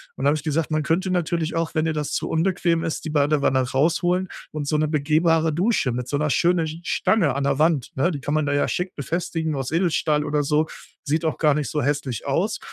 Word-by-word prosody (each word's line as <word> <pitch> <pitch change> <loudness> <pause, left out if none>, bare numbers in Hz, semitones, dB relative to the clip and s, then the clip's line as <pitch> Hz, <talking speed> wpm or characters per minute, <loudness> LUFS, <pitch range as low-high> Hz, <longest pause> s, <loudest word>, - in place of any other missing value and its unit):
Und - - -6
dann - - +3
habe 150 +2 +3
ich 150 - -8
gesagt: 155 0 -1
„Man 155 0 +1
könnte 175 +5 0
natürlich 170 -2 -1
auch, 165 0 -2
wenn 155 0 +1
dir 160 - 0
das 150 -1 -3
zu - - -1
unbequem 170 0 +1
ist, 165 0 -3
die 155 - -3
Badewanne 145 -2 +2
rausholen 175 +7 +1 0.2
und 150 -2 -4
so 155 - 0
'ne 155 0 +1
begehbare 160 +2 +2
Dusche 180 - +1
mit 125 +1 -4
so 145 - -1
'ner 150 0 0
schönen 175 -1 +2 0.2
Stange 165 - +1
an 140 - -1
der 140 0 0
Wand“ 155 -5 +2
ne? 160 +6 +2
Die 145 -6 -4
kann 145 - -2
man 155 -1 +1
da 145 - +1
ja 145 - +1
schick 180 +1 -3
befestigen 160 +2 -2
aus 135 -2 -3
Edelstahl 160 -3 +1
oder 150 0 0
so. 150 +2 +2 0.4
Sieht 160 +2 -1
auch 160 - 0
gar 150 -3 +3
nicht 150 -4 -2
so 150 - -1
hässlich 140 -3 -2
aus, 190 +10 0
155 Hz, 235 wpm, -23 LUFS, 145-165 Hz, 0.4 s, dann